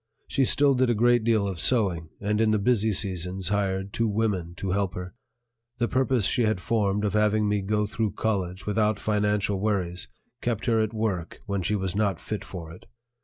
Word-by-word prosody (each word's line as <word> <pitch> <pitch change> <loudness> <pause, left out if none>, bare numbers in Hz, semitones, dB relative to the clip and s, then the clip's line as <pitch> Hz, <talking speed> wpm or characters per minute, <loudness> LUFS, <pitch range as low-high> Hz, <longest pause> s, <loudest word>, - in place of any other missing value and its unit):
She 135 - +2
still 140 +2 +4
did 130 -1 +2
a 120 - +2
great 120 +1 +3
deal 110 -3 +2
of 95 -4 -4
sewing, 90 -8 +1
and 105 +2 0
in 110 - +3
the 110 - +3
busy 110 0 +2
seasons 95 -1 -1
hired 100 -1 -1
two 115 - +1
women 100 -5 -1
to 95 +1 -3
help 95 -1 -1
her. 90 0 -6 0.6
The 120 - +1
purpose 130 -4 +1
she 120 - +3
had 110 -4 +1
formed 105 0 0
of 105 - -1
having 105 0 +2
me 105 -1 +1
go 105 +2 0
through 105 -1 -2
college 95 -4 -2
without 105 0 +1
financial 105 -2 0
worries 95 -4 -1 0.3
kept 115 -2 -2
her 115 -2 +2
at 110 -1 0
work 105 -6 -3
when 100 -2 -2
she 105 +5 0
was 95 -2 -2
not 100 -4 0
fit 105 - -5
for 85 -4 -8
it. 85 - -14
105 Hz, 200 wpm, -26 LUFS, 95-110 Hz, 0.6 s, still